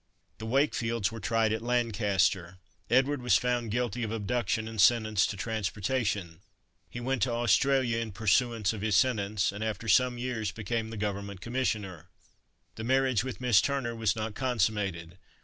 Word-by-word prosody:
The 110 - -6
Wakefields 115 -4 0
were 115 - -7
tried 110 +2 +1
at 110 - -2
Lancaster. 100 -7 0 0.3
Edward 135 +2 +2
was 125 -1 +4
found 120 -2 -1
guilty 120 0 -2
of 110 -2 -2
abduction 110 0 -1
and 110 -2 -1
sentenced 110 -4 +4
to 100 - -5
transportation. 105 -4 -2 0.5
He 120 - -7
went 130 +1 -2
to 125 - +2
Australia 120 +1 +2
in 115 -2 -4
pursuance 110 +1 +1
of 105 - -6
his 105 -1 +1
sentence, 105 -4 +1
and 105 +2 -5
after 110 +1 -4
some 125 +4 +3
years 120 -4 -2
became 110 +2 -3
the 115 - -7
Government 100 -1 -4
commissioner. 105 - -3 0.7
The 110 - -5
marriage 130 -2 +2
with 130 -1 -6
Miss 120 -6 +5
Turner 135 -4 -2
was 110 -3 0
not 110 0 -4
consummated. 100 -8 -1
110 Hz, 160 wpm, -29 LUFS, 100-120 Hz, 0.7 s, Miss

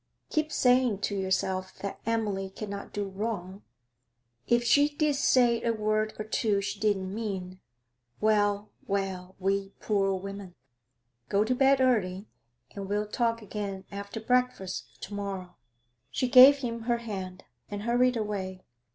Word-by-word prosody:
Keep 310 0 0
saying 250 -5 +3
to 205 - -1
yourself 190 -1 -1
that 200 - -5
Emily 205 -4 -1
cannot 200 0 -7
do 205 -1 -3
wrong; 195 -1 -4 0.9
if 240 0 +3
she 285 +5 +5
did 300 0 +1
say 245 -4 +3
a 230 - +1
word 215 0 0
or 215 - -4
two 215 -1 +1
she 200 +1 -4
didn't 195 -3 0
mean 190 -4 -4 0.6
well, 205 -1 +2 0.2
well, 190 -2 -2
we 195 +1 -1
poor 195 -2 +1
women! 195 -1 -7 0.7
Go 200 +1 +3
to 235 +4 +1
bed 270 +1 +4
early, 205 -7 +1 0.5
and 195 -1 -7
we'll 210 +1 0
talk 230 0 0
again 200 -2 -5
after 200 +2 -6
breakfast 245 -5 -1
to - - -7
morrow.' 195 -3 -5 0.5
She 255 - -1
gave 265 +2 +9
him 235 -4 -3
her 240 - +3
hand, 190 -5 -6 0.3
and 205 0 -5
hurried 245 +1 +3
away. 190 -4 -4
205 Hz, 140 wpm, -28 LUFS, 195-235 Hz, 0.9 s, gave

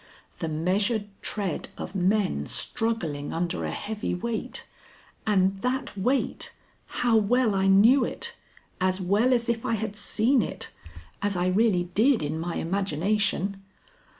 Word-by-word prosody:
The 165 - -2
measured 200 +7 0
tread 195 -6 -3
of - - -6
men 190 - +1
struggling 170 -11 -1
under 170 +1 -2
a - - -2
heavy 210 -3 -3
weight, 225 +5 -4 0.6
and 195 -1 +2
that 255 -1 -1
weight 250 +8 0 0.3
how 240 -2 +1
well 225 +1 +3
I 195 0 +2
knew 225 +8 +6
it! 470 - -4 0.4
as 185 +1 +1
well 205 +7 +2
as 240 -1 +2
if 235 -1 0
I 230 - +1
had 215 -1 -3
seen 225 +5 +2
it, - - -5 0.5
as 205 -1 0
I 175 0 +1
really 195 -2 +3
did 240 - +4
in 155 +2 -2
my 170 +1 -3
imagination. 195 +2 0
205 Hz, 140 wpm, -27 LUFS, 185-230 Hz, 0.6 s, knew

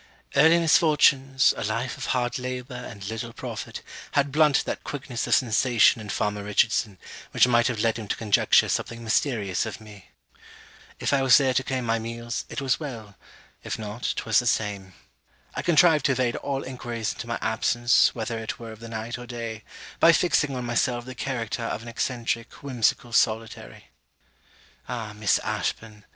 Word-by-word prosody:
Early 160 +4 +6
misfortunes, 140 -5 +4
a - - -4
life 115 +4 -2
of - - -6
hard 125 +1 -1
labour 125 +1 -5
and 120 -5 -8
little 115 +2 -5
profit, - - -7 0.3
had 145 -1 +2
blunted 150 -1 +3
that - - -4
quickness 130 -4 -4
of - - +4
sensation 120 -1 +3
in 105 - -9
farmer 105 +1 -2
Richardson, 105 0 +1 0.3
which - - +4
might 120 -1 +3
have 120 -4 -2
led 115 0 +1
him 110 - -7
to - - -1
conjecture 105 -3 +3
something 115 0 -3
mysterious 110 - 0
of - - -7
me. 105 -3 -14 0.9
If - - 0
I 140 - +3
was 130 -1 +7
there 135 -2 +2
to 130 - +1
claim 130 -2 -3
my 115 0 +1
meals, 115 +1 -5
it - - -5
was 135 -2 +1
well; 115 -9 -8 0.5
if - - -4
not, 110 +2 -4
'twas 115 -2 +2
the 120 - -2
same. 100 -4 -1 0.6
I - - -3
contrived 160 -3 +4
to 135 - +3
evade 125 -2 0
all 140 -1 -3
enquiries 120 -3 -4
into - - -8
my - - -2
absence, 120 +1 +2
whether 115 0 -3
it 110 0 -5
were 115 -1 -9
of 110 - -12
the 115 0 -9
night 115 +2 -5
or 120 - -9
day, 115 -2 -6 0.4
by 165 - +7
fixing 150 -5 +2
on 125 -1 -4
myself 120 0 0
the 130 - -7
character 120 -3 -3
of 115 -1 -3
an - - -11
eccentric 115 0 -3
whimsical 125 -2 0
solitary. 110 - -1 1.0
Ah, 115 -4 -5
Miss 105 -1 +2
Ashburn! 105 -2 -4
120 Hz, 175 wpm, -25 LUFS, 110-130 Hz, 1.0 s, was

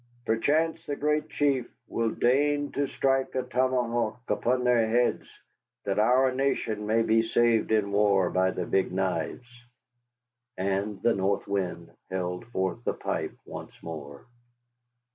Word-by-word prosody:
Perchance 155 +8 +1
the 145 - -2
Great 150 +1 0
Chief 140 -5 +1 0.2
will 115 -1 0
deign 145 +5 +1
to 140 0 -1
strike 135 -1 0
a 130 - 0
tomahawk 120 -3 0
into 125 +1 +1
their 120 -2 +3
heads, 120 +2 +1 0.6
that 100 +1 -1
our 125 +4 +4
nation 115 -6 -1
may 115 +1 +3
be 115 0 +3
saved 115 -1 +2
in 105 -2 +2
war 100 -3 +3
by 95 0 +2
the 90 -1 -3
Big 95 +2 +1
Knives." 95 +4 -2 1.1
And 100 +2 -1
the 120 - +4
North 100 +1 0
Wind 90 -4 -3 0.2
held 90 +3 -3
forth 95 0 -2
the - - -1
pipe - - -3
once - - -9
more. 70 -4 -8
115 Hz, 140 wpm, -27 LUFS, 95-130 Hz, 1.1 s, our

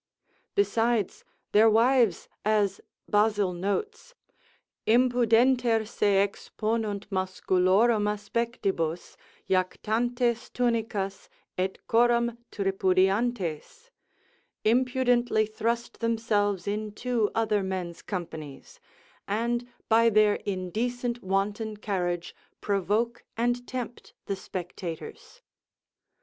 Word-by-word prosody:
Besides, 235 - +1 0.3
their 220 +2 +6
wives 230 -3 +3 0.2
(as 205 -2 +1 0.3
Basil 205 -3 +2
notes) 425 - -3 0.7
Impudenter 240 -1 +3
se 200 -3 +3
exponunt 215 0 -3
masculorum 190 +3 +2
aspectibus, 200 -6 -2 0.3
jactantes 235 +6 0
tunicas, 220 -5 -1 0.3
et 190 +1 -1
coram 235 0 +2
tripudiantes, 195 - 0 0.7
impudently 245 -1 +2
thrust 230 +2 -3
themselves 215 -4 0
into 215 +2 -1
other 215 -2 +2
men's 185 -3 -4
companies, 160 -7 -7 0.5
and 235 +4 -1 0.2
by 230 +1 +5
their 215 -1 +4
indecent 235 +6 -2
wanton 205 +3 -1
carriage 175 -4 -2 0.2
provoke 210 +4 0
and 245 +1 0
tempt 250 -1 -6
the 200 - -2
spectators. 180 -3 -7
215 Hz, 80 wpm, -27 LUFS, 195-235 Hz, 0.7 s, their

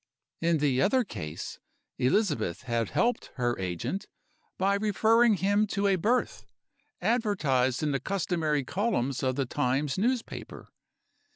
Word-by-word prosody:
In 165 0 +2
the 140 -3 +1
other 255 - +3
case, 75 - -7 0.4
Elizabeth 130 - +1
had 115 -4 -1
helped 245 +1 0
her 120 -2 0
agent 95 - -3 0.5
by 195 +1 +2
referring 215 +3 +3
him 205 +3 +2
to 200 0 -1
a 195 -1 +4
Birth, 230 +8 0 0.5
advertised 165 - +1
in 150 - +1
the 135 - 0
customary 165 -6 -1
columns 140 - -1
of 130 -2 0
the 135 -1 0
Times 135 +6 -1
newspaper. 240 +3 -3
165 Hz, 125 wpm, -28 LUFS, 130-210 Hz, 0.5 s, a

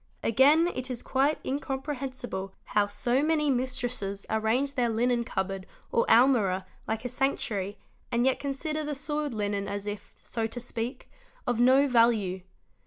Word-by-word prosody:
Again 285 +8 +5
it 255 0 -4
is 245 -2 -4
quite 275 +3 +2
incomprehensible 265 -7 -4
how 205 -1 +1
so 240 +6 +1
many 300 -1 +2
mis 255 0 -1
'tresses 200 -5 -3
arrange 225 +6 +1
their 245 -4 +1
linen 235 +1 +1
cupboard 190 -3 -3 0.2
or 230 - +2
almirah 225 -7 +4 0.2
like 220 +2 -2
a - - +1
sanctuary 220 -6 -1 0.3
and 240 +1 +2
yet 265 - +2
consider 305 +3 -2
the 295 -1 -3
soiled 295 -1 -3
linen 205 -1 -1
as 200 0 -4
if, 205 -1 -6
so 225 -1 -2
to 235 +2 -6
speak, 240 +1 -5 0.4
of 240 -2 0
no 260 +3 +6
value. 230 -7 +3
245 Hz, 155 wpm, -28 LUFS, 210-270 Hz, 0.4 s, no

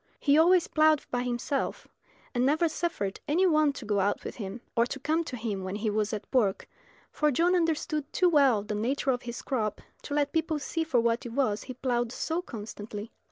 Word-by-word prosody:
He 285 -1 +3
always 345 +2 +5
ploughed 310 -1 +3
by 245 - 0
himself, 245 +3 -2 0.5
and 245 -1 +1
never 310 +5 +3
suffered 315 - -2
any 345 +6 +3
one 310 -4 +4
to 255 - -8
go 205 -1 +1
out 200 +1 0
with - - -7
him, 205 +1 -6
or 235 +1 +3
to 275 - -5
come 315 +4 0
to 255 - -5
him 210 -4 -3
when 190 +1 -4
he 215 +1 -1
was 210 0 0
at 215 -2 -4
work, 210 -7 +2 0.4
for 300 - +2
John 335 +6 +2
understood 315 -3 0
too 365 - +3
well 275 -10 +4
the 210 - -4
nature 260 +6 0
of 245 -1 -1
his 235 -1 -6
crop 220 -6 -1 0.2
to 285 - -4
let 290 -1 +1
people 320 -1 0
see 325 +3 -2
for 310 -7 +2
what 235 0 +1
it 230 - -8
was 245 -6 0
he 255 - -7
ploughed 240 -2 -1
so 325 +6 -2
constantly. 210 - -7
255 Hz, 210 wpm, -28 LUFS, 220-310 Hz, 0.5 s, always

